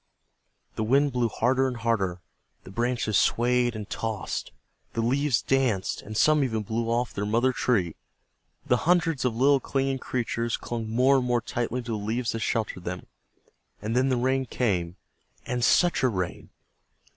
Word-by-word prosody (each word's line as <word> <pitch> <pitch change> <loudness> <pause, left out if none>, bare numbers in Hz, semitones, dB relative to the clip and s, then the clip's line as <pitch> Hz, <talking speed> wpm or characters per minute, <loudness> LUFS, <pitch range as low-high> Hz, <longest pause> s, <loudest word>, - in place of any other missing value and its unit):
The 110 - 0
wind 140 +5 +3
blew 125 -2 +1
harder 130 +4 +1
and 125 -2 -4
harder, 100 -6 -1 0.4
the - - -11
branches 120 -2 +1
swayed 120 0 +2
and 105 -2 -6
tossed, 110 -3 -4 0.4
the 115 - -1
leaves 130 +1 +1
danced, 125 -8 0
and 110 +1 -7
some 155 +2 +4
even 110 -4 -1
blew 115 +2 -2
off 120 +1 +1
of - - -17
their 100 - -2
mother 120 +4 +2
trees; 95 -11 +1 0.7
the 125 - +3
hundreds 165 -4 +1
of 120 -3 0
little 135 +3 +4
clinging 135 0 -1
creatures 120 -2 -2
clung 115 -2 -5
more 130 +4 +4
and 130 - 0
more 120 -1 +2
tightly 120 +1 -3
to 115 - -5
the 105 -2 -3
leaves 115 +3 -1
that 115 - -3
sheltered 105 -4 -2
them, 90 +1 -5 0.7
and 110 +3 -3
then 130 +2 +3
the 130 - +1
rain 130 +1 +1
came, 90 -10 -1 0.5
and 125 -1 -2
such 175 +6 +4
a 130 - +3
rain! 95 -5 -4
120 Hz, 170 wpm, -26 LUFS, 110-130 Hz, 0.7 s, some